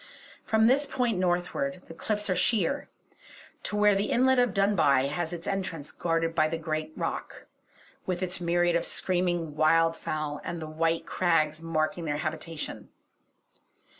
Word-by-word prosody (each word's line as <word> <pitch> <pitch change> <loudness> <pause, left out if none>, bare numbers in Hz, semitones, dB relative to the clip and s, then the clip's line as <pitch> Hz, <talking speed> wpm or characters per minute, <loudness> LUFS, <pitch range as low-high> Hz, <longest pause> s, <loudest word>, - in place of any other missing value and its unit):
From 220 0 +3
this 275 +5 +4
point 245 -7 0
northward, 175 -4 -1
the - - -9
cliffs 210 +4 -2
are 185 - +1
sheer, 205 -5 +1 0.7
to - - -2
where 210 0 +5
the 200 +1 0
inlet 260 +1 +4
of 245 -3 +3
Dunbuy 170 -9 +3
has 160 +2 -2
its 170 -1 -6
entrance 180 -7 -3
guarded 165 -1 -1
by 155 -1 +3
the 165 +1 -2
great 155 -1 -3
rock, - - -4 0.6
with 185 0 -1
its 180 0 -3
myriad 175 0 +2
of 170 - +2
screaming 175 -4 -1
wildfowl 155 -1 +1
and 170 -1 -4
the 160 - -5
white 165 +1 0
crags 160 -3 +1
marking 165 +2 -1
their 145 -1 -1
habitation. 155 +1 -5
170 Hz, 150 wpm, -28 LUFS, 155-190 Hz, 0.7 s, where